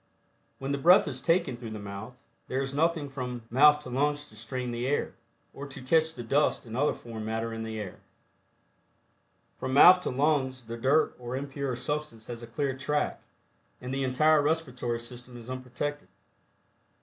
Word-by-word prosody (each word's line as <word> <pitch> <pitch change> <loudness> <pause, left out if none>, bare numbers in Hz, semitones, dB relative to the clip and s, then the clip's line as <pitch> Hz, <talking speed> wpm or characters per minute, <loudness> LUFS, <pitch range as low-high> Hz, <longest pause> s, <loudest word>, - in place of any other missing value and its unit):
When 135 +1 -4
the 140 - -1
breath 175 +6 +6
is 130 -3 -4
taken 165 -6 +2
through 120 -2 -7
the 110 - -6
mouth, 100 +4 -7 0.3
there 130 - -1
is 135 0 -3
nothing 160 0 +1
from 125 -3 -5
mouth 150 +4 +6
to 125 - -8
lungs 145 +3 0
to 110 - -15
strain 120 +3 -4
the 120 +2 -2
air, 145 - 0 0.4
or 140 +1 -7
to 140 0 -9
catch 160 +4 +2
the 120 - -6
dust 140 +5 +1
and 115 -1 -7
other 145 +4 +2
foreign 115 -2 -8
matter 115 +1 -2
in 115 - -5
the 110 -1 -4
air. 100 -3 -7 1.6
From 130 0 -2
mouth 180 +5 +9
to 180 - -3
lungs 130 -2 +1
the 115 0 -6
dirt 135 +7 +2
or 120 +1 -5
impure 140 -1 -3
substance 125 -3 -4
has 120 -1 -7
a 120 - -8
clear 135 +3 -2
track, 150 +2 -1 0.6
and 125 +1 -5
the 135 0 -1
entire 150 +4 +4
respiratory 130 -6 -1
system 120 +1 -10
is 120 +1 -9
unprotected. 130 +3 -4
130 Hz, 180 wpm, -29 LUFS, 120-145 Hz, 1.6 s, mouth